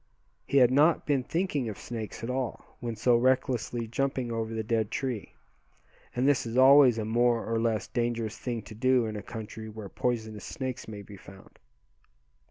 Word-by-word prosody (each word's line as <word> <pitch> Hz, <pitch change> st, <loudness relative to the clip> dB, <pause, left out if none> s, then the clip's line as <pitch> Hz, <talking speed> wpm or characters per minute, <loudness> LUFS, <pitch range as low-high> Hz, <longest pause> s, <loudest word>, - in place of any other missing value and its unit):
He 140 Hz, -, +2 dB
had 125 Hz, -2 st, +6 dB
not 150 Hz, +5 st, +4 dB
been 140 Hz, -3 st, +2 dB
thinking 150 Hz, -4 st, -1 dB
of 105 Hz, -, -6 dB
snakes 115 Hz, -2 st, -6 dB
at 115 Hz, -, -3 dB
all, 130 Hz, -2 st, -4 dB
when 115 Hz, -1 st, -4 dB
so 120 Hz, +3 st, +3 dB
recklessly 125 Hz, -1 st, +1 dB
jumping 130 Hz, 0 st, -1 dB
over 115 Hz, -1 st, -2 dB
the 110 Hz, -1 st, -2 dB
dead 110 Hz, -1 st, 0 dB
tree; 125 Hz, -4 st, -4 dB, 0.8 s
and 125 Hz, +2 st, +2 dB
this 145 Hz, -4 st, +3 dB
is 115 Hz, +1 st, -4 dB
always 130 Hz, -2 st, +7 dB
a 110 Hz, -, -2 dB
more 120 Hz, +1 st, +2 dB
or 115 Hz, 0 st, 0 dB
less 115 Hz, -2 st, 0 dB
dangerous 115 Hz, -2 st, -2 dB
thing 120 Hz, -3 st, -4 dB
to 110 Hz, -, -11 dB
do 125 Hz, +2 st, +2 dB
in 110 Hz, -1 st, -4 dB
a 105 Hz, -, -4 dB
country 110 Hz, +1 st, -8 dB
where 105 Hz, -2 st, -8 dB
poisonous 110 Hz, -3 st, -2 dB
snakes 130 Hz, -1 st, -5 dB
may 105 Hz, -2 st, -7 dB
be 100 Hz, 0 st, -12 dB
found. 95 Hz, 0 st, -15 dB
120 Hz, 180 wpm, -28 LUFS, 110-130 Hz, 0.8 s, always